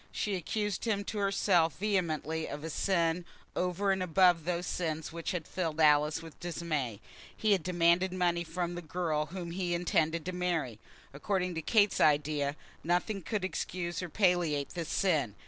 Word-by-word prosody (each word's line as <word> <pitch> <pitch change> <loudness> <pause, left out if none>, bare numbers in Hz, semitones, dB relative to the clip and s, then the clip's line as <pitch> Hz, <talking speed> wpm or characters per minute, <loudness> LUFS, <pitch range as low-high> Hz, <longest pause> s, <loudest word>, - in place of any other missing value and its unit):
She 210 - -2
accused 205 +3 -2
him 205 -3 0
to 210 +1 -4
herself 190 -5 +2
vehemently 160 -6 -1
of 145 +1 -6
a 160 - -4
sin 170 -1 +1 0.3
over 180 +2 0
and 190 -1 0
above 180 -2 +4
those 175 0 -1
sins 160 -3 -3
which 170 -1 -4
had 175 -4 -3
filled 165 -4 -3
Alice 150 +1 +4
with 165 -2 -12
dismay. 155 - -3 0.4
He 215 - +1
had 195 -3 +4
demanded 175 +2 +3
money 175 -2 +1
from 175 +1 -3
the 175 - -5
girl 155 -2 -1
whom 175 -1 -6
he 175 -1 -1
intended 170 -2 +1
to 185 - -2
marry! 170 -11 -2 0.3
According 180 +5 -1
to 160 - -3
Kate's 205 +3 +3
idea, 145 -1 +2 0.3
nothing 180 +4 0
could 205 +1 -2
excuse 175 -2 -3
or 180 - -5
palliate 175 -6 +2
this 170 -2 -5
sin. 150 - +1
175 Hz, 165 wpm, -31 LUFS, 160-185 Hz, 0.4 s, above